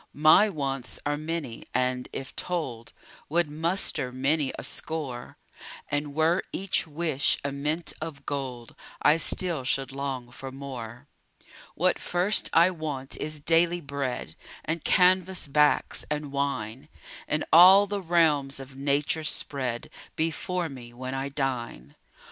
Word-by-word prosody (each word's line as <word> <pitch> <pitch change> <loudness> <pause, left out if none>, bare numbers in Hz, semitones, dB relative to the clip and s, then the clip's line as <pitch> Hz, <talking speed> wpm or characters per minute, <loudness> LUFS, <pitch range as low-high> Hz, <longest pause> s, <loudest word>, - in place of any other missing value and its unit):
My 155 +8 +6
wants 135 -7 -3
are 145 0 0
many 155 -5 -5
and, 125 0 0
if 135 - -7
told, 135 -10 -4 0.4
Would 165 -1 +1
muster 160 -4 +1
many 135 +3 0
a - - -6
score; 140 -7 -3 0.5
And 145 -1 -2
were 160 +4 +2
each 190 -3 +2
wish 155 -2 +1
a 140 - -2
mint 150 +4 -2
of 150 -3 -7
gold, 130 -5 -5 0.3
I 150 +2 +6
still 170 -3 +2
should 135 +1 0
long 135 -3 -5
for 135 +1 -8
more. 130 -2 -8 0.7
What - - +2
first 180 +4 0
I 170 +3 +5
want 150 -6 -4
is 155 0 -3
daily 170 +3 +3
bread 140 -4 -4 0.3
And 160 0 -2
canvas 185 -1 +3
backs, 150 +1 +2
and 150 -1 -3
wine 140 -1 -3 0.4
And 150 0 -1
all 185 +4 +9
the 200 0 -3
realms 155 -6 +2
of 135 0 -11
nature 140 +3 0
spread 130 -5 -1 0.3
Before 165 +2 -1
me, 125 -5 -10
when 130 +2 -6
I 135 +1 -3
dine. 120 - -4
145 Hz, 135 wpm, -27 LUFS, 135-165 Hz, 0.7 s, all